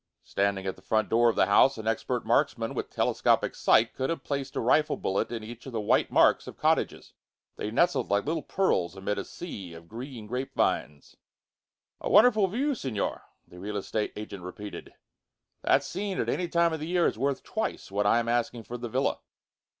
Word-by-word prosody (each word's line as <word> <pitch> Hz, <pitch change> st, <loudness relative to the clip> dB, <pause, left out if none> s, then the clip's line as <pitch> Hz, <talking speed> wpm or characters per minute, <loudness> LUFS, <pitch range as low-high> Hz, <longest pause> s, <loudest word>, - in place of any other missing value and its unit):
Standing 100 Hz, -1 st, -1 dB
at 95 Hz, -, -2 dB
the -, -, -18 dB
front 110 Hz, -1 st, 0 dB
door 120 Hz, +1 st, +4 dB
of -, -, -1 dB
the -, -, +4 dB
house, 110 Hz, +7 st, +5 dB
an 110 Hz, -, -7 dB
expert 110 Hz, -1 st, -1 dB
marksman -, -, +1 dB
with -, -, -4 dB
telescopic -, -, +1 dB
sight 110 Hz, +1 st, +3 dB
could 130 Hz, 0 st, -2 dB
have 165 Hz, -5 st, -3 dB
placed 140 Hz, -2 st, -3 dB
a -, -, 0 dB
rifle 150 Hz, +6 st, +2 dB
bullet 95 Hz, +4 st, -1 dB
in 115 Hz, -2 st, -4 dB
each 120 Hz, +4 st, -10 dB
of 130 Hz, -, -8 dB
the 115 Hz, -, -1 dB
white 105 Hz, -, +2 dB
marks -, -, +4 dB
of -, -, -9 dB
cottages. -, -, 0 dB, 0.4 s
They -, -, -4 dB
nestled -, -, +2 dB
like 100 Hz, 0 st, +1 dB
little 160 Hz, +2 st, -1 dB
pearls 95 Hz, -, 0 dB
amid 95 Hz, +2 st, -2 dB
a -, -, -3 dB
sea 100 Hz, -, -8 dB
of 85 Hz, 0 st, -13 dB
green 120 Hz, +1 st, -8 dB
grape 125 Hz, +5 st, -4 dB
vines. 75 Hz, -1 st, -1 dB, 0.8 s
"A -, -, -3 dB
wonderful 215 Hz, -3 st, +6 dB
view, 265 Hz, +10 st, 0 dB
Signor," 130 Hz, -, -3 dB, 0.3 s
the 90 Hz, -, -13 dB
real 105 Hz, +2 st, -4 dB
estate 105 Hz, +2 st, -2 dB
agent 105 Hz, -2 st, -7 dB
repeated. 100 Hz, +3 st, -8 dB, 0.7 s
"That 140 Hz, -, +3 dB
scene, 190 Hz, +6 st, -3 dB
at -, -, 0 dB
any 180 Hz, -, 0 dB
time 170 Hz, 0 st, +2 dB
of 160 Hz, -, -3 dB
the 155 Hz, -, -5 dB
year, 175 Hz, 0 st, +2 dB
is -, -, 0 dB
worth 140 Hz, +1 st, 0 dB
twice 220 Hz, -, -4 dB
what 100 Hz, +1 st, +1 dB
I 115 Hz, -, +5 dB
am 120 Hz, 0 st, 0 dB
asking 120 Hz, 0 st, 0 dB
for 120 Hz, +3 st, -7 dB
the 120 Hz, 0 st, -5 dB
villa." 130 Hz, +4 st, 0 dB
120 Hz, 205 wpm, -28 LUFS, 105-145 Hz, 0.8 s, wonderful